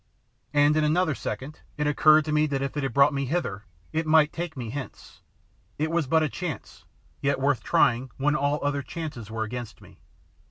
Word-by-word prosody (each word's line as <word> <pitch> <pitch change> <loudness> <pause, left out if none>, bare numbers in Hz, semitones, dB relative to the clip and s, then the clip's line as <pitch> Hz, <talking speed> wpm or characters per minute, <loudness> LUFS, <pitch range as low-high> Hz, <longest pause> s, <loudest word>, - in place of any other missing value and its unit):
And 145 +1 +4
in 155 - +2
another 160 +2 +2
second 140 +2 -6 0.2
it 150 - -1
occurred 155 +1 +5
to 155 - -3
me 150 0 +3
that 135 -2 -2
if 140 - -4
it 145 - -1
had 135 - -2
brought 140 +1 +4
me 140 0 -1
hither 125 - -2 0.3
it 160 0 -1
might 155 -1 +4
take 170 -3 -5
me 120 -3 -5
hence. 135 0 -8 0.6
It 155 +2 -1
was 165 -4 0
but 160 +3 +3
a - - +2
chance, 165 -1 -6 0.4
yet 140 0 +1
worth 135 -1 +1
trying 125 +3 +2
when 145 +2 +1
all 145 0 +1
other 145 0 0
chances 145 - -7
were 110 0 -2
against 120 +1 -6
me. - - -17
145 Hz, 200 wpm, -26 LUFS, 135-155 Hz, 0.6 s, occurred